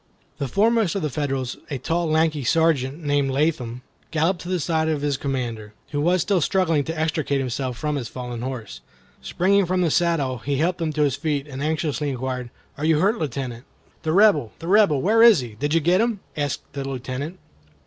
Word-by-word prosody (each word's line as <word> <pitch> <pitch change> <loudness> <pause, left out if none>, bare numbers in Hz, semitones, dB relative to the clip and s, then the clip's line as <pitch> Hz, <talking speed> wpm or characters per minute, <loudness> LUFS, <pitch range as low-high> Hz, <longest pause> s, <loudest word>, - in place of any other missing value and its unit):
The 140 - -1
foremost 215 - +2
of 195 - -2
the 150 - -1
Federals, 135 -3 -2
a 140 - -2
tall, 165 +5 -1
lanky 155 -2 +2
sergeant 155 +1 +1
named 145 -2 +1
Latham, 130 -4 -1 0.3
galloped 165 +3 0
to 175 - -7
the 185 -1 0
side 160 0 0
of 155 -2 -1
his 145 -1 +1
commander, 120 -6 -4 0.2
who 145 -1 -1
was 175 +2 +2
still 195 -4 +1
struggling 165 -3 +2
to 160 0 -4
extricate 155 -3 0
himself 130 -1 -3
from 150 +2 -1
his 125 -4 -4
fallen 125 0 -6
horse. 125 -4 -6 0.4
Springing 195 +1 +2
from 180 0 +1
his 165 - +1
saddle, 145 -8 +1
he 140 +5 -2
helped 175 +4 0
him 160 -2 0
to 150 0 +1
his 140 -3 +1
feet, 145 -2 -2
and 135 -1 -7
anxiously 155 -1 -1
inquired, 130 -1 -3 0.3
"Are 150 - -1
you 160 -1 +4
hurt, 205 +8 +2
Lieutenant?" 130 -5 -4 0.4
"The 160 - -1
Rebel, 170 - +4
the 165 - -8
Rebel, 190 -8 +4
where 220 +4 +4
is 230 - +8
he? 120 - -6
Did 145 +8 -1
you - - +5
get 175 +5 +3
him?" 230 -3 0 0.2
asked 145 -3 -2
the 140 - -4
Lieutenant. 135 +5 -5
150 Hz, 200 wpm, -23 LUFS, 130-170 Hz, 0.4 s, is